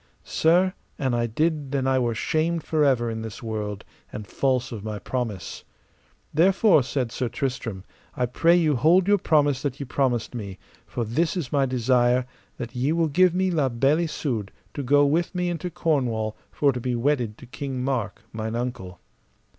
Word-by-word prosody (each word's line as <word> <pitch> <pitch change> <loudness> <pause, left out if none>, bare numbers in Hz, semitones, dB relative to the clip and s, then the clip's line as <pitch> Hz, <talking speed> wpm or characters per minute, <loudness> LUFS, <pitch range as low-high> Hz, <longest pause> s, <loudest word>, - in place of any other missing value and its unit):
Sir, 180 +3 +3 0.2
an 130 -3 0
I 120 0 +1
did 150 +3 -1
then 135 -2 0
I 130 0 +3
were 120 -2 0
shamed 160 +6 0
for 155 -2 +1
ever 120 -5 +2
in 110 0 -4
this 110 0 -7
world, 105 -2 -4 0.3
and 105 - -6
false 130 +2 0
of 110 -4 -6
my 105 -1 -4
promise. 115 -4 -4 0.7
Therefore, 185 +2 +5
said 125 -2 -2
Sir 125 +1 -2
I - - -6
Tristram, 115 -8 -3 0.3
I 125 - +1
pray 165 +8 +3
you 160 -4 +3
hold 175 +8 +4
your 205 0 +4
promise 145 -5 +2
that 140 -1 -3
ye 140 - -4
promised 125 -3 0
me; 100 -5 -6 0.3
for 120 - -3
this 155 - 0
is 150 -9 -4
my 140 -2 +2
desire, 125 0 +2 0.3
that 120 0 -6
ye 130 +4 +1
will 165 -1 +1
give 180 +4 +4
me 185 0 +1
La 150 -6 +1
Beale 135 +6 +2
Isoud 135 - -2 0.2
to 145 - -4
go 145 +2 +4
with 170 +6 0
me 180 0 0
into 175 +1 -3
Cornwall 130 -11 0 0.2
for 145 -1 +2
to 125 - -4
be 125 0 -1
wedded 120 -4 0
to - - -12
King 130 0 -5
Mark, 125 -7 -2
mine 110 +1 -3
uncle. 105 -8 -4
130 Hz, 185 wpm, -25 LUFS, 120-155 Hz, 0.7 s, Therefore